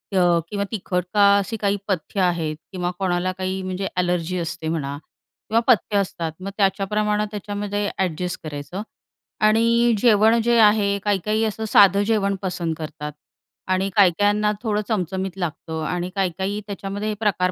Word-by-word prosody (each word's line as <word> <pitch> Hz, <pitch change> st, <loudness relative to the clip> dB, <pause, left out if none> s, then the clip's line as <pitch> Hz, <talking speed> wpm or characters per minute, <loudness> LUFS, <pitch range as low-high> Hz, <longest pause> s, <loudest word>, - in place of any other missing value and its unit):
अ, 175 Hz, -2 st, +4 dB
किंवा 200 Hz, -1 st, -2 dB
तिखट 180 Hz, -4 st, -2 dB
का? 200 Hz, -1 st, +6 dB
अशी 200 Hz, +3 st, -2 dB
काही 200 Hz, -1 st, 0 dB
पथ्य 195 Hz, 0 st, -2 dB
आहेत 170 Hz, -4 st, 0 dB, 0.2 s
किंवा 180 Hz, -2 st, -2 dB
कोणाला 185 Hz, -1 st, 0 dB
काही 190 Hz, 0 st, -2 dB
म्हणजे 185 Hz, +1 st, -3 dB
एलर्जी 180 Hz, 0 st, 0 dB
असते 165 Hz, -1 st, -4 dB
म्हणा 145 Hz, -3 st, -2 dB, 0.5 s
किंवा 225 Hz, -, +3 dB
पथ्य 215 Hz, -4 st, +3 dB
असतात 175 Hz, -4 st, -2 dB
मग 190 Hz, +1 st, -5 dB
त्याच्या 195 Hz, -1 st, +2 dB
प्रमाणे 210 Hz, 0 st, +1 dB
त्याच्यामध्ये 205 Hz, 0 st, -3 dB
एडजस्ट 180 Hz, -1 st, -2 dB
करायचं 150 Hz, +4 st, -6 dB, 0.6 s
आणि 230 Hz, +2 st, +4 dB
जेवण 220 Hz, +1 st, +4 dB
जे 235 Hz, +1 st, +3 dB
आहे 210 Hz, -2 st, +4 dB
काही 205 Hz, -2 st, +1 dB
काही 215 Hz, +1 st, +1 dB
असं 220 Hz, +1 st, -3 dB
साधं 200 Hz, -1 st, +6 dB
जेवण 200 Hz, -3 st, +1 dB
पसंत 180 Hz, -4 st, -2 dB
करतात 150 Hz, -1 st, -6 dB, 0.6 s
आणि 185 Hz, +1 st, +1 dB
काही 195 Hz, -4 st, +6 dB
काहींना 210 Hz, +1 st, +3 dB
थोडं 210 Hz, -2 st, 0 dB
चमचमीत 190 Hz, -2 st, -2 dB
लागतं 160 Hz, -2 st, -4 dB
आणि 180 Hz, +2 st, -2 dB
काही 190 Hz, -2 st, +1 dB
काही 200 Hz, +2 st, -2 dB
त्याच्यामध्ये 200 Hz, +1 st, -4 dB
हे -, -, -1 dB
प्रकार 190 Hz, -4 st, +1 dB
195 Hz, 160 wpm, -22 LUFS, 180-210 Hz, 0.6 s, का